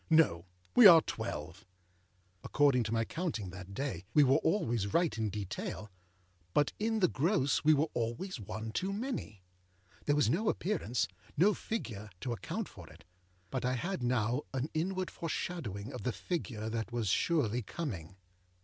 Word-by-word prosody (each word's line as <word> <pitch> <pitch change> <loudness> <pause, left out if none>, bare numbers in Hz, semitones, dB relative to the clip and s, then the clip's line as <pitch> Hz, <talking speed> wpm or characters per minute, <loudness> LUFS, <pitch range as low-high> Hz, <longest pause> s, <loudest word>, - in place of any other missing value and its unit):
No. 155 - +4 0.3
We 245 -4 +11
are 165 -3 +10
twelve.â 95 - -5 0.8
According 140 -4 +3
to 110 - -3
my 115 0 +1
counting 145 - -3
that 95 +1 -9
day, 135 -5 -3
we 150 - +8
were 135 +1 +5
always 120 - 0
right 170 -8 +3
in 110 -1 -1
detail, 105 +1 -5 0.6
but 145 - +3
in 220 0 0
the 180 - +6
gross 150 -2 +1
we 155 0 +6
were 145 +2 +3
always 120 - -2
one 110 +2 -5
too 190 - -1
many. 205 - -4 0.6
There 145 - +3
was 150 - +3
no 195 +8 +1
appearanceâno 175 - 0 0.3
figureâto 125 - -1
account 105 - -4
for - - -12
it; - - -16 0.5
but 130 - -2
I 125 +1 +1
had 175 +6 -2
now 120 +1 +1
an 135 +4 -2
inward 185 +3 -1
foreshadowing 140 - -4
of 125 - -6
the 125 - -1
figure 110 - -4
that 115 +1 -3
was 120 -3 -1
surely 125 - +2
coming. 100 - -5
125 Hz, 155 wpm, -33 LUFS, 110-165 Hz, 0.8 s, We